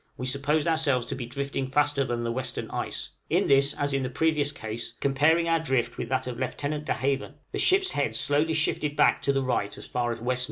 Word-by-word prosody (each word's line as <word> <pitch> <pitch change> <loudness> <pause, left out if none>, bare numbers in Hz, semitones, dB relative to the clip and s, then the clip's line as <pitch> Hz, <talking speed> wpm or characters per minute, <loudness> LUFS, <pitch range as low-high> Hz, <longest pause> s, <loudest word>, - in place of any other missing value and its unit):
we 125 - -4
supposed 140 +4 +1
ourselves 150 -7 +2
to - - -4
be 125 -3 -5
drifting 140 +1 -3
faster 145 +1 +2
than 120 -2 -2
the 115 - -1
western 125 0 -2
ice; - - -4 0.2
in - - +2
this, 140 0 +4
as 145 -1 -1
in 135 - +1
the 130 - -2
previous 150 +1 +1
case, 110 -4 -6
comparing 150 +5 +3
our 165 0 +3
drift 130 -6 -1
with - - -4
that 130 0 0
of 125 -1 -5
Lieutenant 145 +3 -3
De - - +1
Haven, 135 0 -2 0.2
the - - -3
ship's 380 0 +3
head 125 -6 -1
slowly 150 +6 +2
shifted 150 -1 0
back - - +4
to 140 - +2
the 135 -1 0
right 115 -5 -1
as - - -9
far 120 -1 -1
as 115 - -3
W.N. 125 +2 -1
140 Hz, 230 wpm, -27 LUFS, 125-150 Hz, 0.2 s, this